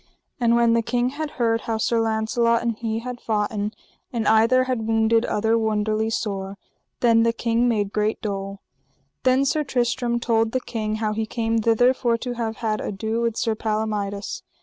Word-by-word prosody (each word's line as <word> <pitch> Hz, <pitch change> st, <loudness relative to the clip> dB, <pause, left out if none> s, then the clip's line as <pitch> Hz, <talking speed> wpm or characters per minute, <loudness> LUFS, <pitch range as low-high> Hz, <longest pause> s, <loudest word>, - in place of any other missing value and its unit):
And 235 Hz, -1 st, +3 dB
when 235 Hz, -1 st, +4 dB
the 230 Hz, -, +3 dB
king 240 Hz, +2 st, 0 dB
had 300 Hz, +3 st, -4 dB
heard 230 Hz, -2 st, +1 dB
how 225 Hz, -1 st, -2 dB
Sir 230 Hz, +1 st, +1 dB
Launcelot 225 Hz, +1 st, +1 dB
and 235 Hz, -1 st, 0 dB
he 225 Hz, 0 st, -3 dB
had 250 Hz, 0 st, -6 dB
foughten, 210 Hz, -1 st, -1 dB, 0.4 s
and 230 Hz, -3 st, -2 dB
either 230 Hz, +4 st, +5 dB
had 250 Hz, -4 st, -2 dB
wounded 225 Hz, +1 st, +3 dB
other 225 Hz, +2 st, +1 dB
wonderly 215 Hz, 0 st, 0 dB
sore, 195 Hz, -3 st, -3 dB, 0.4 s
then 230 Hz, -2 st, +5 dB
the 230 Hz, 0 st, +3 dB
king 230 Hz, +1 st, +1 dB
made 210 Hz, -4 st, 0 dB
great 210 Hz, +1 st, 0 dB
dole. 195 Hz, -1 st, -4 dB, 0.6 s
Then 260 Hz, +2 st, +3 dB
Sir 300 Hz, +2 st, +1 dB
Tristram 245 Hz, -2 st, 0 dB
told 225 Hz, -1 st, +1 dB
the 255 Hz, -, +2 dB
king 215 Hz, -3 st, -3 dB
how 215 Hz, -1 st, -1 dB
he 220 Hz, 0 st, -2 dB
came 225 Hz, 0 st, 0 dB
thither 230 Hz, +3 st, +4 dB
for 240 Hz, -2 st, 0 dB
to 245 Hz, +1 st, -4 dB
have 230 Hz, -2 st, -3 dB
had 215 Hz, -2 st, -2 dB
ado 220 Hz, +3 st, -2 dB
with 230 Hz, -1 st, -1 dB
Sir 225 Hz, -, +1 dB
Palomides. 215 Hz, -2 st, -3 dB
225 Hz, 180 wpm, -23 LUFS, 215-235 Hz, 0.6 s, either